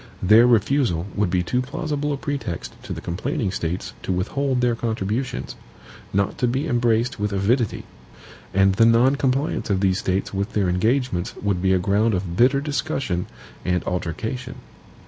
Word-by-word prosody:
Their 110 +6 +7
refusal 115 - +2
would 105 -3 0
be 90 0 +1
too 125 +9 0
plausible 150 +1 -3
a 140 - -1
pretext 140 - -4
to - - -8
the - - -4
complaining 110 - -2
States 90 -1 -3
to - - -3
withhold 130 +9 0
their 125 -1 +2
contributions, 115 +2 -3 0.6
not 100 0 0
to 125 - +2
be 130 +6 -1
embraced 120 -1 +1
with 105 0 -1
avidity; 105 +4 0 0.7
and 95 0 +4
the 115 +4 +4
non 120 +4 +5
compliance 135 -1 0
of 100 -2 +2
these 95 -1 +2
States 95 +2 -1
with 100 +4 -2
their 100 -4 +1
engagements 110 0 0
would 100 -3 -1
be 95 0 +2
a 95 - +4
ground 100 +4 +2
of 90 -2 -3
bitter 130 +6 +4
discussion 135 - -2 0.4
and 90 0 0
altercation. 95 +8 -4
110 Hz, 165 wpm, -23 LUFS, 95-130 Hz, 0.7 s, Their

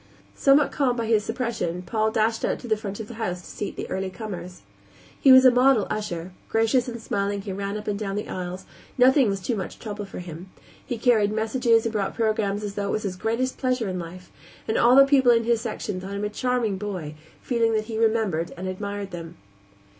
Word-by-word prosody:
Somewhat 275 +1 +4
calmed 255 -3 +1
by 230 - -1
his 220 -2 +2
suppression, 225 -7 -3
Paul 220 +2 0
dashed 220 +1 0
out - - 0
to 245 - -10
the 220 - +2
front 205 -1 -6
of 220 - -6
the 240 - -9
house 180 -4 -2
to - - -12
seat 205 - -5
the - - -5
early 190 0 -2
comers. 180 - -8 0.6
He 270 - +6
was 260 0 +9
a 255 - +9
model 250 -3 +4
usher; 180 -4 -4 0.2
gracious 225 +3 +2
and 235 -1 -5
smiling 200 -2 -2
he 200 - -5
ran 200 +1 -3
up 210 - -8
and 205 -1 -1
down 200 -2 -3
the 210 - -3
aisles; 185 +1 -5 0.3
nothing 260 -1 +5
was 195 -1 -1
too 230 +5 -2
much 190 -3 -5
trouble 210 -2 -6
for 195 - -10
him; 175 +1 -8 0.3
he 245 - -4
carried 220 -3 +3
messages 225 +1 +2
and 230 - -1
brought 200 -3 -1
programs 215 -2 0
as 205 -1 -4
though 200 0 -2
it - - -1
were - - -1
his 185 - -4
greatest 230 +7 -2
pleasure 255 -5 0
in 185 -1 -3
life, 180 +2 -9 0.4
and 220 - 0
all 240 +2 +5
the 275 0 +9
people 270 -3 +5
in 230 -1 +3
his 230 -1 +1
section 210 -4 -4
thought 195 +2 -6
him 200 - -3
a - - -1
charming 230 -3 -1
boy, 185 -7 -5 0.3
feeling 230 -2 +1
that 215 0 0
he 220 -1 -4
remembered 220 -7 +1
and 185 +2 -5
admired 200 +1 -4
them. 165 -2 -8
215 Hz, 225 wpm, -25 LUFS, 195-235 Hz, 0.6 s, was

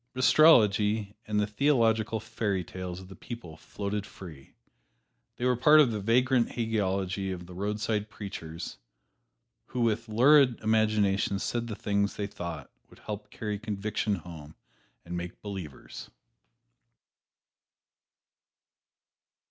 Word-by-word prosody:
But 130 0 -3
astrology 105 -8 +5
and 105 -1 0
the 105 - +2
theological 115 -2 +2
fairy 110 -4 -2
tales 90 +1 -7
of 95 - -12
the 95 - -11
people 115 -10 -9
floated 100 +5 -4
free. 80 -9 -12 0.8
They 120 - -3
were 125 - +4
a - - +1
part 150 +5 +6
of 140 -6 +5
the 105 - -2
vagrant 120 +4 +2
hagiology 100 -4 -1
of 90 -1 -6
the 90 - -11
roadside 105 +2 -2
preachers, 85 - -7 0.9
who 125 - -3
with 115 0 0
lurid 130 +2 +5
imaginations 105 -3 +1
said 120 -1 -2
the 110 - -5
things 100 -1 0
they 105 - -2
thought 85 -7 -7 0.2
would - - -18
help 105 0 -7
carry 105 -2 -4
conviction 105 -1 -2
home 80 -3 -10 0.5
and 85 +1 -5
make 85 0 -6
"believers." 95 -9 -8
105 Hz, 125 wpm, -29 LUFS, 95-115 Hz, 0.9 s, part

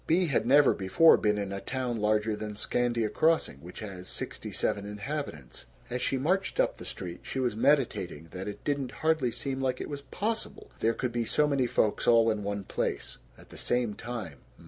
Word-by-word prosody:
Bea 175 +3 +4
had 140 -6 +1
never 140 +1 +6
before 95 - +6
been 105 -1 +1
in 100 -1 -3
a 100 - -4
town 125 -3 -2
larger 105 0 +1
than 105 0 -5
Scandia 120 +1 0
Crossing, 160 - +2
which 85 +9 -10
has 95 -4 -7
sixty - - -4
seven 100 - 0
inhabitants. 105 - -5 0.3
As 125 +1 -2
she 135 - 0
marched 185 +9 0
up - - +2
the - - -9
street 90 -2 -6
she 135 - -4
was 125 -4 0
meditating 110 - +1
that 95 +2 -6
it 105 - -7
didn't 140 -3 -1
hardly 155 -6 +3
seem 135 +3 -3
like 130 -1 0
it - - -5
was 140 -1 -4
possible 215 +11 -4
there 115 +1 +2
could 125 -1 -2
be 120 0 0
so 150 +6 +3
many 140 -4 +2
folks 110 -2 +1
all 115 -1 +6
in 110 -1 -2
one 100 0 -3
place - - -3 0.2
at - - -17
the - - -9
same 120 -3 +1
time. 105 - -6
120 Hz, 200 wpm, -29 LUFS, 105-135 Hz, 0.3 s, never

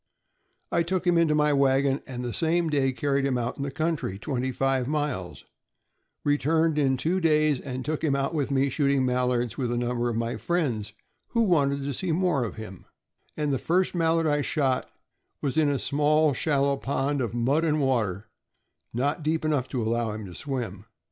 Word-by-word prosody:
" - - -47 0.3
I 170 - +2
took 185 +2 -1
him 175 -1 +3
into 165 -2 +3
my 150 -1 +3
wagon 135 0 +2
the 125 -2 -4
same 165 0 +1
day 140 -2 +2
and 130 - -2
carried 140 -1 +1
him 135 -2 +1
out 120 0 -3
into 140 0 -3
the - - -9
country 155 - -2
twenty 130 +3 -2
five 135 -1 0
miles; 145 -11 -3 0.8
returned 150 +2 +2
in 135 -2 +2
two 165 +8 0
days; 155 -5 +2 0.2
took 155 +2 -3
him 145 -4 +2
out 140 +3 -1
with 145 -4 -1
me 140 0 +2
shooting 140 -1 +1
mallards 125 -2 0
with 125 -3 -1
a 120 - -1
number 120 0 -1
of 115 - -2
my 115 +1 -2
friends, 125 -12 -1 0.4
who 230 -1 +3
wanted 140 -8 +2
to 140 0 -2
see 180 +6 -2
more 160 -6 +1
of 110 - -6
him; 110 -4 -9 0.5
and 150 -2 0
the 130 - 0
first 180 +2 +1
mallard 165 -1 +2
I 145 -1 +2
shot 135 -2 0 0.5
was 140 -2 -2
in 155 -2 +3
a 140 - +1
small, 150 +2 +2
shallow 140 0 +1
pond 140 +1 -1
of 120 -1 -3
mud 135 +7 +2
and 155 -2 +1
water, 110 -8 0 0.7
not 140 +7 -1
deep 155 +1 -1
enough 145 -5 +1
to 125 -3 -2
allow 115 0 0
him 110 -1 -6
to 90 - -9
swim. 115 -6 -5
140 Hz, 195 wpm, -26 LUFS, 125-155 Hz, 0.8 s, him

